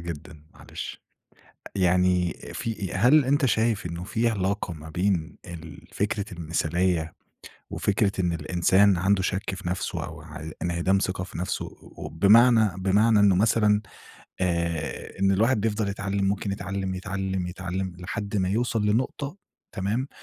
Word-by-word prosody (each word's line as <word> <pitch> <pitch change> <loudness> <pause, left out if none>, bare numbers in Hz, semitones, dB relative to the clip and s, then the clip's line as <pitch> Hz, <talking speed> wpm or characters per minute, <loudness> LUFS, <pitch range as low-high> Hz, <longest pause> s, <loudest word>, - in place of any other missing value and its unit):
جدًا 80 -2 -8
معلش، - - -8 0.7
يعني 90 -1 +3 0.2
في 105 -5 -3
أ - - -1
هل 140 +4 +5
أنت 140 +2 +2
شايف 110 -4 +1
إنه 85 +1 -5
في 115 +5 0
علاقة 100 -3 -1
ما 80 0 -10
بين 90 -1 -1
ال 85 -2 -10
فكرة 100 0 -1
المثالية 85 0 0 0.6
وفكرة 105 0 +1
إن 90 -2 +1
الإنسان 90 +5 +3
عنده 95 +2 +2
شَك 95 +1 -2
في 90 - -6
نفسه 90 +1 -2
أو - - -8
ع 80 0 -8
إنعدام 90 +2 +1
ثقة 95 -1 -2
في 90 - -9
نفسه؟ 90 - -2
أ - - -15
أو - - -5
بمعنى 110 +5 +5
بمعنى 105 +4 +4
إنه 100 -2 +5
مثلًا 105 0 +3 0.6
آآ 85 -3 -2
إن 95 0 +4
الواحد 110 +4 +3
بيفضل 105 -1 0
يتعلّم 100 0 -2
ممكن 100 0 0
يتعلّم، 95 -1 -3
يتعلّم، 95 0 -3
يتعلّم 95 +1 -4
لحد 100 +3 -4
ما 95 -2 +1
يوصل 115 0 0
لنقطة 130 - -1 0.4
تمام؟ 110 +8 -1
95 Hz, 145 wpm, -26 LUFS, 90-105 Hz, 0.7 s, هل